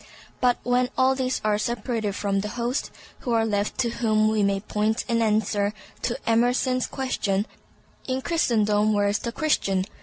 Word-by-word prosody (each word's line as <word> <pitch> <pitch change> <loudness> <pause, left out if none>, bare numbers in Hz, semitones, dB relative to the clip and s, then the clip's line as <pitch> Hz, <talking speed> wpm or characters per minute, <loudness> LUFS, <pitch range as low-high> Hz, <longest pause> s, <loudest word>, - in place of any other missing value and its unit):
But 250 -1 +3
when 250 0 +2
all 260 0 +4
these 260 -1 -1
are 210 -1 +2
separated 230 -3 -2
from 200 -1 0
the 205 - -2
host, 240 +3 -1 0.3
who 240 - -2
are 225 -1 +3
left 205 -1 -1
to 235 -2 0
whom 215 -2 +2
we 215 -1 +1
may 200 -1 +2
point 215 +2 -1
in 230 -1 +1
answer 210 -1 +1 0.3
to 240 - -1
Emerson's 245 +2 +2
question, 210 -7 -1 0.6
"In 260 0 -2
Christendom, 215 -10 +2
where 205 -1 +2
is 205 - 0
the 235 - -4
Christian?" 195 - +1
225 Hz, 170 wpm, -25 LUFS, 210-250 Hz, 0.6 s, all